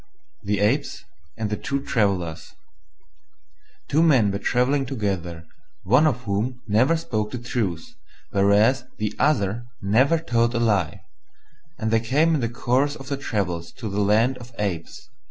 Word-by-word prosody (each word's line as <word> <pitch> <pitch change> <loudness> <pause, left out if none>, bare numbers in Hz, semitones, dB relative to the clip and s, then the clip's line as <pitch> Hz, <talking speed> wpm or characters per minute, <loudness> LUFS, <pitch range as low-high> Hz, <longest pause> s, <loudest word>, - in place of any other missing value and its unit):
THE 100 -1 -1
APES 135 +8 0 0.3
AND 110 -2 -3
THE 105 - -1
TWO 140 +5 -2
TRAVELLERS 95 -10 -1 1.3
Two 150 +3 +2
men 130 -11 +4
were 100 - -3
travelling 130 +4 +1
together, 95 -9 -3 0.4
one 125 +10 +4
of 125 -5 0
whom 110 +5 -2
never 125 +10 +3
spoke 110 -9 -2
the 125 - -5
truth, 120 - -3 0.4
whereas 105 +5 +3
the 105 0 -2
other 120 -5 +1
never 125 +11 +3
told 120 -6 0
a - - +1
lie: 105 -8 +1 0.8
and 110 -2 -2
they 115 - +4
came 145 +8 +2
in 150 - +1
the 115 - -1
course 130 +4 0
of 135 -1 -10
their 140 - -1
travels 90 -10 -3
to 110 -4 -6
the 100 +1 0
land 110 +6 +2
of 120 0 -11
Apes. 90 -6 -4
115 Hz, 155 wpm, -23 LUFS, 100-130 Hz, 1.3 s, men